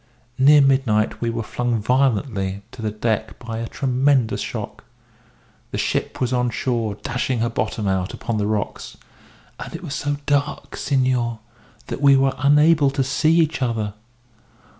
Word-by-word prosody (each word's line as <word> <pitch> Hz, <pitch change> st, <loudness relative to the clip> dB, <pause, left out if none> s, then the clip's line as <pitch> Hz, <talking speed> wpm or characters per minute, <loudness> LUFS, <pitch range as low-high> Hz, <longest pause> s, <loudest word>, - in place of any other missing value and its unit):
Near 145 Hz, +2 st, +7 dB
midnight 130 Hz, -6 st, +2 dB
we 120 Hz, -, 0 dB
were 115 Hz, 0 st, -3 dB
flung 120 Hz, +1 st, -1 dB
violently 105 Hz, -5 st, 0 dB
to 115 Hz, -, -10 dB
the 110 Hz, -, -1 dB
deck 110 Hz, 0 st, -2 dB
by 115 Hz, -2 st, -6 dB
a 115 Hz, -, -3 dB
tremendous 130 Hz, -2 st, +1 dB
shock. -, -, -6 dB, 0.9 s
The -, -, -4 dB
ship -, -, -2 dB
was 125 Hz, -1 st, 0 dB
on 125 Hz, -1 st, +1 dB
shore, 115 Hz, -3 st, -1 dB
dashing 125 Hz, +3 st, -2 dB
her 115 Hz, +1 st, 0 dB
bottom 110 Hz, -2 st, -2 dB
out 95 Hz, -1 st, 0 dB
upon 115 Hz, -2 st, -3 dB
the 105 Hz, -, 0 dB
rocks. 105 Hz, -2 st, -3 dB, 0.6 s
And -, -, -7 dB
it 170 Hz, -, -8 dB
was 150 Hz, -5 st, -5 dB
so 145 Hz, +1 st, -2 dB
dark, 145 Hz, 0 st, -1 dB
senor, 125 Hz, -4 st, 0 dB, 0.5 s
that -, -, -6 dB
we 140 Hz, -1 st, +6 dB
were 135 Hz, 0 st, +2 dB
unable 150 Hz, +1 st, +5 dB
to 135 Hz, 0 st, 0 dB
see 155 Hz, +5 st, +2 dB
each 160 Hz, -3 st, +1 dB
other. 110 Hz, -4 st, -1 dB
125 Hz, 160 wpm, -21 LUFS, 110-140 Hz, 0.9 s, Near